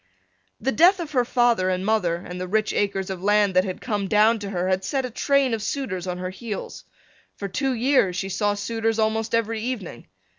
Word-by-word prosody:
The 270 Hz, -, 0 dB
death 360 Hz, +6 st, +5 dB
of 330 Hz, -3 st, -5 dB
her 255 Hz, -4 st, +2 dB
father 240 Hz, -6 st, +2 dB
and 185 Hz, 0 st, -1 dB
mother 205 Hz, -6 st, +1 dB
and 180 Hz, +1 st, -7 dB
the 185 Hz, -, -3 dB
rich 215 Hz, +3 st, 0 dB
acres 195 Hz, -2 st, -1 dB
of 185 Hz, -2 st, -6 dB
land 205 Hz, 0 st, +3 dB
that 185 Hz, -, +5 dB
had 185 Hz, -2 st, -5 dB
come 205 Hz, -5 st, -2 dB
down 220 Hz, +3 st, +4 dB
to 200 Hz, -1 st, -5 dB
her 180 Hz, -2 st, -2 dB
had 190 Hz, 0 st, 0 dB
set 265 Hz, +5 st, -1 dB
a 250 Hz, -, -6 dB
train 275 Hz, +1 st, +2 dB
of 225 Hz, -, -2 dB
suitors 200 Hz, -7 st, -3 dB
on 180 Hz, 0 st, -3 dB
her 185 Hz, 0 st, -4 dB
heels. 210 Hz, +1 st, -7 dB, 0.5 s
For 200 Hz, -, -5 dB
two 265 Hz, +8 st, -1 dB
years 240 Hz, -7 st, +2 dB
she 190 Hz, +1 st, -3 dB
saw 205 Hz, +2 st, 0 dB
suitors 225 Hz, +2 st, -1 dB
almost 220 Hz, +1 st, 0 dB
every 225 Hz, -1 st, -1 dB
evening. 220 Hz, -, -5 dB
210 Hz, 215 wpm, -24 LUFS, 185-235 Hz, 0.5 s, death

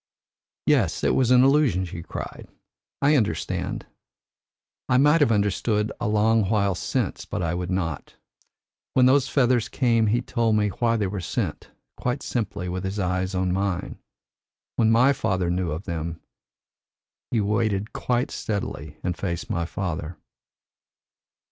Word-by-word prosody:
"Yes, -, -, +2 dB
it -, -, +3 dB
was 130 Hz, -3 st, +2 dB
an 125 Hz, 0 st, +6 dB
illusion," 135 Hz, -, +3 dB
she 85 Hz, -1 st, -7 dB
cried. -, -, -7 dB, 0.6 s
"I 145 Hz, +2 st, +5 dB
understand. 105 Hz, -, -1 dB, 1.0 s
I 125 Hz, -, +4 dB
might 150 Hz, +4 st, +5 dB
have 140 Hz, -, +4 dB
understood 105 Hz, +1 st, +1 dB
a 120 Hz, -, -1 dB
long 110 Hz, -1 st, +3 dB
while 100 Hz, -3 st, +2 dB
since, 90 Hz, -, -2 dB
but -, -, -4 dB
I 85 Hz, 0 st, 0 dB
would 90 Hz, 0 st, -3 dB
not. 85 Hz, -5 st, -3 dB, 0.8 s
When 130 Hz, -, +6 dB
those 135 Hz, +1 st, +4 dB
feathers 125 Hz, -4 st, +2 dB
came 115 Hz, -4 st, +2 dB
he 115 Hz, +3 st, +2 dB
told 115 Hz, -3 st, +1 dB
me 105 Hz, -1 st, +2 dB
why 115 Hz, +3 st, 0 dB
they 105 Hz, -, 0 dB
were 95 Hz, 0 st, -3 dB
sent, -, -, -3 dB, 0.3 s
quite 125 Hz, +2 st, -2 dB
simply, 105 Hz, -6 st, -3 dB
with 90 Hz, +1 st, -3 dB
his 95 Hz, +2 st, -3 dB
eyes 95 Hz, 0 st, -1 dB
on 90 Hz, -1 st, 0 dB
mine. 95 Hz, -1 st, -2 dB, 0.8 s
When 110 Hz, -2 st, +3 dB
my 125 Hz, +5 st, +5 dB
father 95 Hz, -9 st, 0 dB
knew 90 Hz, -1 st, -1 dB
of 80 Hz, +4 st, -4 dB
them, 85 Hz, -2 st, -4 dB, 1.1 s
he 115 Hz, -, +1 dB
waited 105 Hz, 0 st, 0 dB
quite 125 Hz, 0 st, -1 dB
steadily 80 Hz, -8 st, -4 dB
and 90 Hz, -1 st, -1 dB
faced 90 Hz, +1 st, -4 dB
my 85 Hz, -5 st, -1 dB
father." 85 Hz, -1 st, -4 dB
105 Hz, 150 wpm, -24 LUFS, 90-120 Hz, 1.1 s, an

